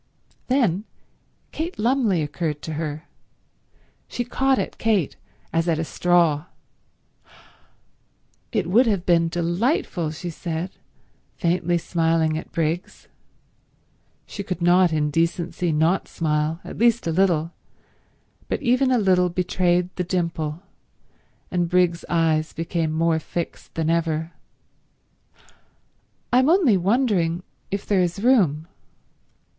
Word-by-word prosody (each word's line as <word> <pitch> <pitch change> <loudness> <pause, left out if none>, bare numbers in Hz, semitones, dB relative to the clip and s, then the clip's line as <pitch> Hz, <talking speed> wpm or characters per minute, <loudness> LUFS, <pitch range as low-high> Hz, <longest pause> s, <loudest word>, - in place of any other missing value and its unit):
Then 225 -7 +1 0.7
Kate 335 +3 -4
Lumley 225 - +2
occurred 150 0 -3
to 160 - -4
her. 155 0 -4 1.0
She 245 - -3
caught 265 +2 +1
at - - -4
Kate 210 -9 +1 0.4
as 165 +1 +1
at 165 -2 +2
a 160 - -1
straw. 170 -3 +2 2.1
"It 210 -5 0
would 225 +9 +4
have 195 -5 0
been 170 -1 +3
delightful," 175 - 0
she 170 +3 -6
said, 170 +2 -4 0.6
faintly 175 0 +1
smiling 165 -2 +1
at 160 - -6
Briggs—she 170 +4 -8
could 185 -3 -4
not 175 0 +4
in 150 -1 0
decency 170 +2 0
not 160 +5 +1
smile, 155 0 -1
at - - -9
least 235 0 +3
a 165 - 0
little, 170 -2 +2 1.0
but - - -1
even 255 +2 +3
a 255 - +3
little 185 -4 +3
betrayed 180 0 0
the 180 - 0
dimple, 170 -2 -2 0.9
and 175 -2 0
Briggs's 175 -1 +2
eyes 160 -2 +1
became 165 -1 -2
more 160 0 +1
fixed 170 +1 -6
than 160 0 0 2.4
ever—"I'm 255 +3 +4
only 330 - +4
wondering 185 -4 +1 0.3
if 200 0 -3
there 195 -3 +2
is 180 +3 -2
room." 180 - +3
175 Hz, 115 wpm, -23 LUFS, 165-195 Hz, 2.4 s, would